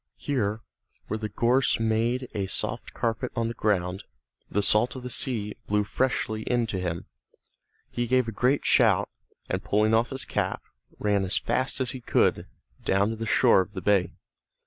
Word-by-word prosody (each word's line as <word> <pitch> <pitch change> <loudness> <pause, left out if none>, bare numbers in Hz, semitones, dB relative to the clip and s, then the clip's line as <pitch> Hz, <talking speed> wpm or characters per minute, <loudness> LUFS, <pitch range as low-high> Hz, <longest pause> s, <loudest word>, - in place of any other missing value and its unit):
Here, 110 -6 -1 0.4
where 110 - -3
the 110 -1 -4
gorse 120 +5 +2
made 115 +3 0
a 100 -3 -2
soft - - -3
carpet 115 +2 -2
on 115 -2 0
the - - -4
ground, 95 -3 0 0.5
the 100 +3 0
salt 110 +6 +2
of 130 - -7
the 125 - -5
sea 110 -6 -1
blew 105 0 +2
freshly 110 -1 -1
in 120 +1 0
to 95 - -1
him. 85 -2 -3 0.9
He 120 0 -2
gave 130 0 +2
a - - -2
great 125 +6 +1
shout, - - +4 0.4
and - - -2
pulling 105 +2 +2
off 115 +2 +3
his 135 -1 -4
cap, - - -2 0.3
ran 100 -2 +1
as 95 - 0
fast 130 +1 -1
as 130 -2 -1
he 130 - -7
could, - - +1 0.4
down 100 +3 +2
to - - -3
the 115 0 -5
shore 95 - +5
of 95 +2 -7
the - - -5
bay. 95 -4 +2
110 Hz, 180 wpm, -26 LUFS, 100-125 Hz, 0.9 s, shore